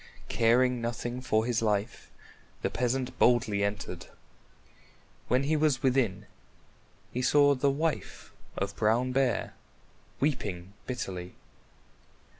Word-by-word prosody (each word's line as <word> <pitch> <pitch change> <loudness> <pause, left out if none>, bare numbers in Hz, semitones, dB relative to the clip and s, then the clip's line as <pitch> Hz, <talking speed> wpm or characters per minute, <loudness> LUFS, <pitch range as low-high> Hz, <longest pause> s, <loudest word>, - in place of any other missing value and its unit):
Caring 125 +2 +3
nothing 120 +1 -3
for 110 -3 +1
his 120 -1 0
life, 105 0 -1 0.5
the - - 0
peasant 125 +1 -1
boldly 115 -4 +3
entered. 100 -3 -4 1.2
When 125 +3 +2
he 155 +3 +1
was 150 -3 +1
within, 120 -7 +1 0.9
he 125 - -2
saw 145 +2 +5
the 140 +1 +1
wife 155 +3 -3 0.2
of 100 0 -2
Brown 115 +4 +2
Bear 130 -1 0 0.7
weeping 100 - -2
bitterly. 90 -8 -5
120 Hz, 105 wpm, -29 LUFS, 105-130 Hz, 1.2 s, saw